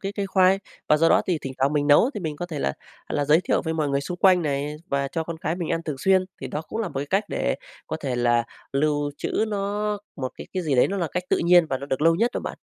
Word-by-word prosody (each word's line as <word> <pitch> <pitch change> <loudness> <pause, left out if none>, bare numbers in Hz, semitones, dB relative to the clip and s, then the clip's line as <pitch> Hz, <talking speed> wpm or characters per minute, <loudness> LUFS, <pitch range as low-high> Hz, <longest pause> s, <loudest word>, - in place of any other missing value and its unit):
cái 195 +1 -4
cây 200 -1 -2
khoai. 190 0 +4 0.3
Và 150 - +6
do 165 +2 +4
đó - - +5
thì 180 -4 +1
thỉnh 135 - -4
thoảng 135 +2 +2
mình 145 -1 +1
nấu 150 - +5
thì - - -4
mình 155 -4 -4
có 175 - -4
thể 160 -4 -5
là 70 - 0 0.4
là 145 - 0
giới 150 +3 +5
thiệu - - 0
với 160 -1 -1
mọi 155 -2 0
người 140 0 +1
xung 175 +6 -5
quanh 185 -2 +5
này, 145 0 -2
và 140 0 0
cho 165 +3 -3
con 170 0 -5
cái 160 +1 -2
mình 175 -3 -3
ăn 165 - 0
thường 150 -4 -4
xuyên, 190 +5 +3 0.2
thì - - -4
đó 150 - -4
cũng - - -4
là 215 - -2
một 135 - -4
cách 195 +3 +2
để - - -1 0.3
có 160 - -3
thể 130 -4 -2
là 120 -1 +2 0.3
lưu 145 +1 +1
trữ 220 - 0
nó 205 0 -1 0.2
một 130 -2 -4
cái - - -8
cái 185 - -1
gì 150 -4 0
đấy 125 - +4
nó 200 - -2
là 175 -4 -1
cách 180 - -2
tự - - +2
nhiên 175 -1 +6
và 135 - -1
được 140 +1 -3
lâu 165 +1 +5
nhất 230 +8 +2
đó - - -1
bạn. - - -6
160 Hz, 295 wpm, -24 LUFS, 145-185 Hz, 0.4 s, Và